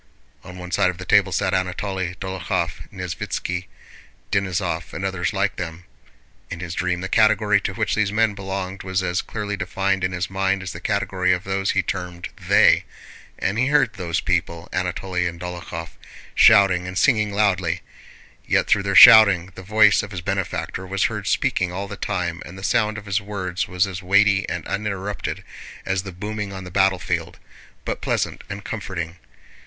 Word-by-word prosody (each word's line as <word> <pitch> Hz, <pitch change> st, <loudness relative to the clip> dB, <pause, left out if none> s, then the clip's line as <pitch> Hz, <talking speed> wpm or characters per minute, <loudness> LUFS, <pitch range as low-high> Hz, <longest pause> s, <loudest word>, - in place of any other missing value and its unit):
On 90 Hz, 0 st, -10 dB
one 90 Hz, 0 st, -8 dB
side 90 Hz, -1 st, +3 dB
of 90 Hz, -, -5 dB
the 95 Hz, -, -8 dB
table -, -, +4 dB
sat -, -, 0 dB
Anatole, 95 Hz, 0 st, -2 dB
Dólokhov, 90 Hz, -3 st, -3 dB
Nesvítski, 90 Hz, 0 st, -4 dB, 0.7 s
Denísov, 90 Hz, -4 st, -1 dB
and 95 Hz, -, -4 dB
others 95 Hz, -2 st, -1 dB
like -, -, -1 dB
them 85 Hz, -1 st, -6 dB, 0.7 s
(in 85 Hz, -, -6 dB
his 85 Hz, -1 st, -5 dB
dream 90 Hz, 0 st, -1 dB
the 95 Hz, -, -3 dB
category 110 Hz, -1 st, +3 dB
to 95 Hz, -, -3 dB
which -, -, -1 dB
these 105 Hz, -2 st, +1 dB
men 110 Hz, 0 st, +2 dB
belonged 95 Hz, -1 st, -5 dB
was 95 Hz, 0 st, -1 dB
as 90 Hz, 0 st, 0 dB
clearly 105 Hz, -2 st, -4 dB
defined 95 Hz, 0 st, -1 dB
in 95 Hz, -, 0 dB
his 90 Hz, 0 st, -2 dB
mind 95 Hz, 0 st, -1 dB
as 90 Hz, -, -5 dB
the 85 Hz, -, -7 dB
category 95 Hz, -2 st, +1 dB
of 90 Hz, +1 st, -2 dB
those 95 Hz, 0 st, -1 dB
he 100 Hz, -, +1 dB
termed 90 Hz, -1 st, -5 dB, 0.2 s
they), -, -, +5 dB, 0.5 s
and 100 Hz, +4 st, -1 dB
he 130 Hz, -, +3 dB
heard 140 Hz, -5 st, +3 dB
those 90 Hz, -4 st, -2 dB
people, 85 Hz, 0 st, -1 dB
Anatole 95 Hz, +1 st, -3 dB
and 85 Hz, 0 st, -6 dB
Dólokhov, 90 Hz, -2 st, -6 dB, 0.4 s
shouting 90 Hz, -2 st, +5 dB
and 90 Hz, +1 st, -5 dB
singing 105 Hz, -5 st, +3 dB
loudly; 95 Hz, -4 st, +1 dB, 0.7 s
yet -, -, +2 dB
through 100 Hz, -, +3 dB
their 100 Hz, 0 st, -2 dB
shouting 95 Hz, -1 st, +9 dB
the 95 Hz, -, -10 dB
voice 105 Hz, +2 st, +4 dB
of 105 Hz, -, -7 dB
his 95 Hz, -4 st, -6 dB
benefactor 95 Hz, 0 st, -3 dB
was 95 Hz, +1 st, -1 dB
heard -, -, -2 dB
speaking 90 Hz, -1 st, +1 dB
all 100 Hz, +3 st, -4 dB
the -, -, -7 dB
time 90 Hz, -4 st, -3 dB
and 95 Hz, -, -11 dB
the 95 Hz, -, -10 dB
sound 105 Hz, +1 st, +1 dB
of 105 Hz, -, -8 dB
his 100 Hz, +1 st, 0 dB
words 95 Hz, -3 st, -3 dB
was 90 Hz, +1 st, +1 dB
as 95 Hz, -2 st, -6 dB
weighty 100 Hz, +1 st, +3 dB
and -, -, -4 dB
uninterrupted 100 Hz, 0 st, -3 dB, 0.4 s
as 95 Hz, -1 st, 0 dB
the 100 Hz, 0 st, -8 dB
booming 105 Hz, +2 st, -5 dB
on 95 Hz, -1 st, -7 dB
the 90 Hz, -, -9 dB
battlefield, 90 Hz, -3 st, 0 dB, 0.5 s
but -, -, -3 dB
pleasant -, -, -1 dB
and 100 Hz, 0 st, -7 dB
comforting. 90 Hz, -6 st, -5 dB
95 Hz, 180 wpm, -22 LUFS, 90-100 Hz, 0.7 s, shouting